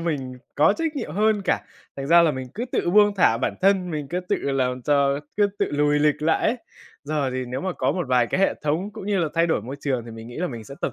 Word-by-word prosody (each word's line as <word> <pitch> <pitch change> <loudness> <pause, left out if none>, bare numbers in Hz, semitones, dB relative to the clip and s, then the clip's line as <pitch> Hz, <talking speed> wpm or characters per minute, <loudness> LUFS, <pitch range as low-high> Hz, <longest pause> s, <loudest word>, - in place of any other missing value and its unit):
mình 135 -6 -3 0.2
có 155 +7 +4
trách 320 -2 -2
nhiệm 155 - -4
hơn 210 +1 +2
cả. - - +1 0.4
Thành 135 0 -4
ra 170 +2 +6
là 160 - +4
mình 130 -2 -5
cứ 235 - -3
tự 175 - 0
buông 205 +1 +5
thả 115 -10 +4
bản - - -1
thân, 190 -2 +3
mình 150 -3 -4
cứ 180 +1 -2
tự 180 - -1
làm 130 -2 -1
cho 140 0 +2 0.2
cứ 205 -1 +4
tự - - +1
lùi 145 0 +2
lịch 150 0 +1
lại 160 +1 +2
ấy. 235 +3 +1 0.5
Giờ 145 -3 -1
thì 130 0 -3
nếu 125 +2 -4
mà 185 -1 -2
có 130 -1 0
một 175 -5 -3
vài 125 -2 +3
cái 185 - -1
hệ 195 - +3
thống 160 +7 -1
cũng 215 -3 -8
như 200 -2 +1
là 165 -3 +1
thay 165 +1 +3
đổi 160 - 0
môi 130 +5 -7
trường 130 -5 -1
thì 115 - -9
mình 115 0 -9
nghĩ 120 - -10
là 180 +2 -1
mình 115 -6 -7
sẽ 135 - -10
tập 130 - -2
150 Hz, 280 wpm, -23 LUFS, 130-185 Hz, 0.5 s, ra